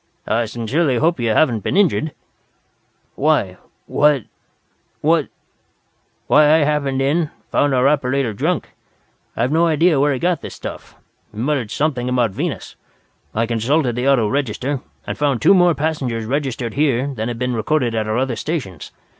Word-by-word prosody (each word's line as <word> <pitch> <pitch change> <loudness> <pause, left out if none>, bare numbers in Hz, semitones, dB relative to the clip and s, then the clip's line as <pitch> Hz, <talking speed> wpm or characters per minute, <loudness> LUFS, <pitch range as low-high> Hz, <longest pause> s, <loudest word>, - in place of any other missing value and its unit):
I 115 +2 +1
sincerely 120 +5 0
hope 165 +4 +1
you 120 -1 0
haven't 115 0 +3
been 145 - -2
injured." 165 -6 +2 1.0
"Why 135 -11 +1 0.3
what 145 -4 +2 0.8
what 160 -1 +2 0.5
" - - -45
"Why 150 +1 +5
I - - +5
happened 140 -2 0
in, 155 +3 +1 0.2
found 145 -2 +2
our 125 +1 +3
operator 135 -4 +1
drunk. 100 - -1 0.7
I've 120 +4 0
no 165 +2 +3
idea 160 -1 +3
where 145 +1 +3
he 135 - 0
got 175 +3 0
the - - -6
stuff. - - -9 0.4
He 105 - -15
muttered 130 -1 -1
something 130 -2 -1
about 125 -4 +1
Venus. - - -4 0.6
I 115 +2 +1
consulted 120 +3 0
the 125 +3 +1
auto 120 -6 +3
register, 135 +2 -2 0.2
and - - -5
found 140 -4 +1
two 195 - +5
more 175 -3 +4
passengers 135 -7 -2
registered 130 -3 -2
here 135 -3 +1
than 110 -2 -3
had 120 -1 -4
been 125 +1 -1
recorded 120 +1 0
at 110 -1 -1
our 110 +1 -1
other 130 -1 0
stations. 110 - -5
135 Hz, 165 wpm, -19 LUFS, 115-150 Hz, 1.0 s, Why